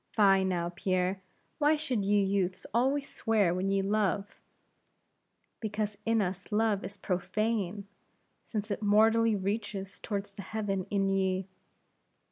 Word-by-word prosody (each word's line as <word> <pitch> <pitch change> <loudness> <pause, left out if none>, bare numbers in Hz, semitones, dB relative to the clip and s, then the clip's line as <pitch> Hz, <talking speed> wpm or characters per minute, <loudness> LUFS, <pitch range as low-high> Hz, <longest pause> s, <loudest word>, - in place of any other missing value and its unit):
"Fie, 195 -3 +5
now, 175 -2 0
Pierre; 185 +1 0 0.4
why 300 +1 +4
should 265 -9 -1
ye 205 +1 +3
youths 190 -2 0
always 270 +4 +2
swear 210 -6 +1
when 185 +2 -1
ye 195 0 +2
love!" 205 0 0 1.2
"Because 210 -1 -2
in 225 -2 +3
us 185 +2 -4
love 210 -1 +2
is 195 +2 -7
profane, 205 +1 -1 0.6
since 210 -1 -4
it 200 - -2
mortally 220 +2 +4
reaches 200 0 -3
toward 200 -2 -3
the 200 - -6
heaven 200 -3 -2
in 195 -1 +1
ye!" 190 -1 0
200 Hz, 130 wpm, -30 LUFS, 190-220 Hz, 1.2 s, Fie